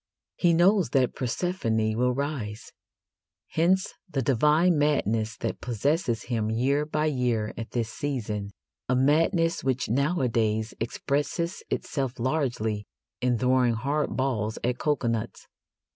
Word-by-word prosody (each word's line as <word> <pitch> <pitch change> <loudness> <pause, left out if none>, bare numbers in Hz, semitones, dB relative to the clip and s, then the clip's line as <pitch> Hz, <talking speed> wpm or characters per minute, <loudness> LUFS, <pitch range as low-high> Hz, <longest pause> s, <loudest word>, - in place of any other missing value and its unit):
He 170 -2 +3
knows 185 +2 +4
that 130 -2 +2
Persephone 115 -6 -1
will 125 +1 +1
rise. 130 -7 -4 0.8
Hence 185 +4 +2 0.2
the 135 -6 -1
divine 150 +7 +3
madness 115 -7 +1
that - - -4
possesses 125 - 0
him 110 -3 -1
year 135 +6 +1
by 155 0 0
year 125 -7 0
at 115 0 -6
this 115 -2 -2
season 110 -8 -3 0.4
a 130 - +3
madness 165 +5 +2
which 130 -3 0
nowadays 115 -6 +1
expresses 145 +8 -2
itself 135 -3 -2
largely 120 -6 -1 0.3
in 125 -1 +2
throwing 125 -1 +3
hard 140 +6 -1
balls 115 -5 -1
at 125 +1 0
coconuts. 120 -6 -1
130 Hz, 120 wpm, -27 LUFS, 115-150 Hz, 0.8 s, knows